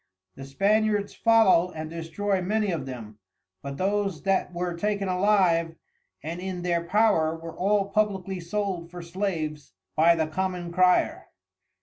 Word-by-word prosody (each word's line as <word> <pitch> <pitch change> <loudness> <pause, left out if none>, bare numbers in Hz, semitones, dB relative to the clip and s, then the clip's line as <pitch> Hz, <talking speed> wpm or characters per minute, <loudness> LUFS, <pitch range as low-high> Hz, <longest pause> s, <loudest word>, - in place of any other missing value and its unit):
The 135 - -9
Spaniards 205 +7 +1
follow 215 -6 +4
and 155 0 -5
destroy 175 +4 -2
many 210 +2 0
of 145 -6 -3
them, 110 -5 -8 0.4
but 140 0 -6
those 195 -2 -1
that 195 -2 +1
were 175 0 -3
taken 200 +2 -1
alive 180 -4 +2 0.5
and 165 +3 -5
in 185 -2 -4
their 170 -1 0
power 170 -4 +2
were 165 0 -9
all 200 +1 +1
publickly 195 -3 0
sold 180 -1 -3
for 175 0 -8
Slaves 165 -5 -4 0.2
by 165 +2 +5
the 160 -1 0
Common 180 +1 -3
Crier. 180 +1 +2
180 Hz, 140 wpm, -26 LUFS, 165-200 Hz, 0.5 s, by